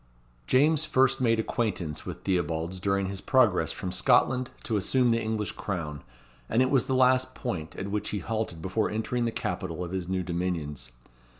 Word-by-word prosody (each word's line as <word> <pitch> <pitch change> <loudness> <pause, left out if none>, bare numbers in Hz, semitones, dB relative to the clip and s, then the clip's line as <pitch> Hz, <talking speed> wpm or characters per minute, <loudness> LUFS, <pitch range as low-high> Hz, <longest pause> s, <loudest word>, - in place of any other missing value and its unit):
James 150 +3 +4
first 135 -4 +2
made 115 -2 +3
acquaintance 100 -9 -2
with - - -7
Theobalds 85 -1 -1
during 100 +1 +1
his 95 0 -5
progress 125 -8 +3
from 90 - -5
Scotland 125 +5 +3
to 115 - -1
assume 120 +5 +2
the 115 0 +2
English 110 -3 -2
crown, 80 -8 -4 0.5
and 120 +3 +3
it 130 - 0
was 135 -4 +3
the 130 - +1
last 130 0 +3
point 80 -11 -4
at 100 +1 -5
which 105 0 -2
he 105 - -2
halted 100 -4 -3
before 95 +3 0
entering 120 +3 -1
the 115 - 0
capital 90 -5 -3
of 85 - -6
his 95 -2 -3
new 95 -1 0
dominions. 85 -8 -3
105 Hz, 180 wpm, -28 LUFS, 90-125 Hz, 0.5 s, James